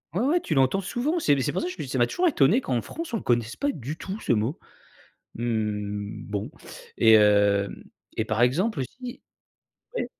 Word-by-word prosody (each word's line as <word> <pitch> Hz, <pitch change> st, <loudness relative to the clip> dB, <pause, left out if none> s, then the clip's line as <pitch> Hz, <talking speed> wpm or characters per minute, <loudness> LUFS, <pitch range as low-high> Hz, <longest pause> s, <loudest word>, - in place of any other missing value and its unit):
Ouais, 195 Hz, -, +1 dB
ouais, 325 Hz, +7 st, +2 dB
tu 155 Hz, -, -2 dB
l'entends 135 Hz, +8 st, +3 dB
souvent, 265 Hz, -, -1 dB
c'est 145 Hz, -, +3 dB
c'est 130 Hz, -, 0 dB
pour 185 Hz, -, -2 dB
ça, -, -, -2 dB
je 180 Hz, -, -5 dB
te 165 Hz, -, -5 dB
dis, -, -, -7 dB
ça 130 Hz, 0 st, -2 dB
m'a 120 Hz, -, +4 dB
toujours 360 Hz, 0 st, +1 dB
étonné 220 Hz, -, +4 dB
qu'en 125 Hz, -, -1 dB
France, 325 Hz, -6 st, -7 dB
on -, -, +1 dB
ne -, -, -6 dB
connaisse 120 Hz, -1 st, 0 dB
pas 285 Hz, 0 st, 0 dB
du 145 Hz, -, -6 dB
tout 190 Hz, +4 st, -6 dB
ce -, -, -1 dB
mot. 115 Hz, +8 st, 0 dB, 0.8 s
Mmh, 105 Hz, -3 st, -3 dB
bon 100 Hz, -1 st, -3 dB, 0.5 s
et 110 Hz, -1 st, +7 dB
heu 100 Hz, -1 st, +4 dB, 0.5 s
et 110 Hz, -, 0 dB
par 110 Hz, +1 st, -1 dB
exemple 170 Hz, -, +2 dB
aussi 245 Hz, -, -6 dB, 0.7 s
oui? -, -, -1 dB
130 Hz, 205 wpm, -26 LUFS, -, 0.8 s, et